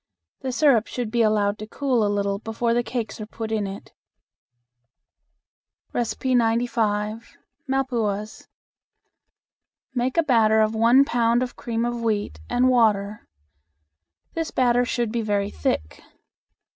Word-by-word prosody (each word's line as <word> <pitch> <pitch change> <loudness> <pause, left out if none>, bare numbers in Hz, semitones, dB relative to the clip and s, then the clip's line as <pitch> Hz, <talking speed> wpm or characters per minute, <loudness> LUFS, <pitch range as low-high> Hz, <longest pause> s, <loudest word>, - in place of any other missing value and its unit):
The 260 - -3
syrup 250 -4 +3
should 240 -3 -4
be 235 0 +2
allowed 215 -1 +2
to 215 - -7
cool 255 -1 0
a 205 - +1
little 200 -1 -1
before 225 +2 -1
the 240 - +2
cakes 225 -2 -4
are 210 - -6
put 225 0 -6
in 215 -2 -1
it. 195 0 -9 2.0
95. 230 -3 0 0.3
Malpuas. 230 -6 -2 1.5
Make 255 +2 -1
a 335 - +5
batter 225 -6 +4
of 215 0 +2
one 235 +5 +5
pound 235 -1 +2
of 250 - -6
cream 230 0 -2
of 240 0 -3
wheat 210 - -1
and 250 +1 +3
water. 210 -4 +1 1.1
This 325 -1 -2
batter 245 -1 +2
should 240 -2 -1
be 235 0 -1
very 205 -2 -1
thick. 75 0 -2
230 Hz, 130 wpm, -24 LUFS, 215-245 Hz, 2.0 s, a